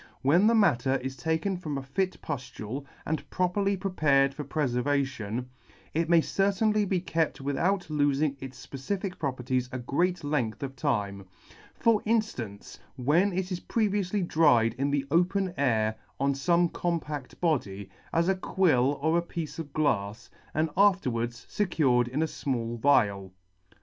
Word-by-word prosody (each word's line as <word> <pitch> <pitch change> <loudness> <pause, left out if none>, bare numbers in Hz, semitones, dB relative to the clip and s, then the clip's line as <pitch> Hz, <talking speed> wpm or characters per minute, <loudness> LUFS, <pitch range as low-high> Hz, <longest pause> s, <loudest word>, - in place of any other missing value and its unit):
When 170 +10 +5
the 230 - +4
matter 135 - +3
is 130 0 -4
taken 160 +7 -1
from 155 -5 -4
a 135 - -5
fit 185 +8 -2
puftule, 125 -2 -5 0.2
and 160 0 -3
properly 195 +2 0
prepared 145 -8 +2
for 150 - -5
prefervation, 130 -5 -1 0.5
it 165 +1 0
may 170 -1 +6
certainly 205 +4 +1
be 190 -1 0
kept 165 -2 -1
without 175 +8 0
lofing 145 -1 +1
its 130 -1 -9
fpecific 180 +7 -4
properties 130 -2 -1
a 130 - -3
great 170 +8 0
length 145 -6 -1
of 135 -1 -5
time 105 -8 -1
j 95 - -13 0.5
for 230 -2 +3
inftance, 210 - -2 0.2
when 150 +10 +2
it 185 +1 -3
is 180 - -2
pre 220 +2 0
vioufly 200 -2 -1
dried 125 -10 +4
in 140 +1 +1
the 140 -1 0
open 180 +2 +2
air 110 -7 +1 0.3
on 140 +1 +2
fome 170 +5 +2
compact 155 -6 -3
body, 100 - -1 0.2
as 165 +1 +2
a 190 - +4
quill 150 -8 +2
or 160 +2 +3
a - - -1
piece 165 -2 -6
of 150 -3 -6
glafs, 115 -9 -1 0.2
and 155 +1 +1
afterwards 125 - +1
fecured 140 -11 +2
in 135 +6 -1
a - - +2
fmall 120 -6 -3
vial*. 100 -8 +2
145 Hz, 155 wpm, -28 LUFS, 130-180 Hz, 0.5 s, may